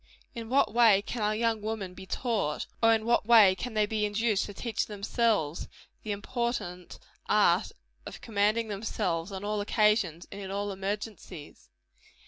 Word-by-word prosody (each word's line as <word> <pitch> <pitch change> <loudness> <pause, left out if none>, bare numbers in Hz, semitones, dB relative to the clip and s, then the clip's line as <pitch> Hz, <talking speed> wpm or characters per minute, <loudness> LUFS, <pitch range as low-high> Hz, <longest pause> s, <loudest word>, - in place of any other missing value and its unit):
In 230 -3 -7
what 270 -3 +2
way 225 -4 +5
can 235 +2 -5
our 210 0 +1
young 225 -1 0
women 210 -4 -4
be 190 +1 -11
taught 215 - -2 0.2
or 225 0 +5
in 220 0 -3
what 235 -2 +2
way 220 -5 +7
can 220 +4 -6
they 215 -1 +3
be 215 0 -2
induced 210 0 +1
to 205 - -8
teach 230 +1 -2
themselves 205 -5 -1 0.3
the 215 - -5
important 205 -4 -4 0.3
art - - +3 0.4
of - - -8
commanding 215 +1 0
themselves, 195 -4 -3
on 190 0 -6
all 210 0 -1
occasions, 205 -5 +1
and 200 - -7
in 190 - -6
all 200 +1 -3
emergencies? 195 -4 -6
210 Hz, 160 wpm, -29 LUFS, 195-225 Hz, 0.4 s, way